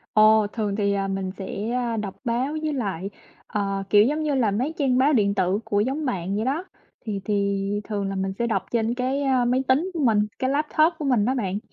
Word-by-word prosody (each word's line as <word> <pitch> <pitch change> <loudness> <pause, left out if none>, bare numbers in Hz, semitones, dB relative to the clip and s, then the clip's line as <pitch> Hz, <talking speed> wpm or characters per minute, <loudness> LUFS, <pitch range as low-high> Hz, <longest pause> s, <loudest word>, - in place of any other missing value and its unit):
Ồ, 215 0 +6
thường 210 -3 -2
thì, 200 -1 +1
à, 195 -1 -1
mình 195 -1 -2
sẽ, 200 +3 -4
a, 240 -2 -1
đọc 205 -3 -4
báo 245 +5 0
với 310 - -1
lại, 200 - -3 0.4
ờ, 195 -2 -2
kiểu, 210 0 +7
giống 300 +5 0
như 300 -2 0
là, 235 -6 +2
mấy 255 +11 -1
trang 260 -4 +2
báo 285 +3 +4
điện 200 -5 +2
tử 190 0 +1
của 205 - 0
giống 270 +8 -1
bạn 195 -6 -2
vậy 215 - -1
đó. 285 +8 -1 0.4
Thì 200 -2 -2
thì 200 0 0
thường 200 -2 -3
là 195 - -3
mình 190 0 -1
sẽ 235 - +1
đọc 195 -5 0
trên 230 0 0
cái, 260 +3 -1
a, 260 -3 +2
máy 250 +2 +2
tính 310 +9 +2
của 330 - -2
mình, 225 -6 +3 0.2
cái 260 - 0
laptop 310 +3 +2
của 300 - -4
mình 245 -7 +2
đó 260 +3 +1
bạn. 200 -5 -2
220 Hz, 235 wpm, -24 LUFS, 200-260 Hz, 0.4 s, kiểu